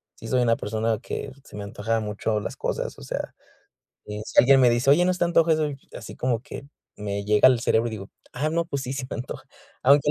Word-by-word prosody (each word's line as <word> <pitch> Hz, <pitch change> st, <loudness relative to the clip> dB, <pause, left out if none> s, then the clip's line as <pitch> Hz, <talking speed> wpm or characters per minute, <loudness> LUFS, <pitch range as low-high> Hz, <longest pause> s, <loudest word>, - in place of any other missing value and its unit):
sí 115 Hz, -, -10 dB
soy 125 Hz, +1 st, +2 dB
una 115 Hz, -1 st, +3 dB
persona 110 Hz, +1 st, -1 dB
que 140 Hz, -, -5 dB
se -, -, -13 dB
me 105 Hz, -, -5 dB
antoja 110 Hz, +3 st, -2 dB
mucho 105 Hz, +1 st, -1 dB
las -, -, -6 dB
cosas, -, -, -3 dB
o -, -, -11 dB
sea. -, -, -4 dB, 0.7 s
Eh, 105 Hz, 0 st, -6 dB
si -, -, -9 dB
alguien 135 Hz, +1 st, +7 dB
me 125 Hz, -, +6 dB
dice: 120 Hz, +3 st, +2 dB
"Oye, 175 Hz, +5 st, +5 dB
¿no 185 Hz, -, +3 dB
te 180 Hz, -, 0 dB
antoja 165 Hz, -1 st, +4 dB
eso?". 155 Hz, -1 st, 0 dB, 0.3 s
Así -, -, -9 dB
como 120 Hz, -2 st, 0 dB
que 140 Hz, 0 st, -9 dB, 0.3 s
me 100 Hz, -1 st, -3 dB
llega 105 Hz, +4 st, +6 dB
al 125 Hz, -3 st, +4 dB
cerebro 115 Hz, 0 st, +2 dB
y -, -, -9 dB
digo: 100 Hz, -2 st, -7 dB, 0.2 s
"Ah, 145 Hz, +5 st, -1 dB
no, 170 Hz, +1 st, 0 dB
pues 140 Hz, -5 st, -3 dB
sí, 130 Hz, -, -4 dB
se 135 Hz, -2 st, -4 dB
me -, -, -4 dB
antoja". 135 Hz, +2 st, -7 dB, 0.4 s
Aunque 140 Hz, +2 st, +5 dB
125 Hz, 240 wpm, -25 LUFS, 110-140 Hz, 0.7 s, alguien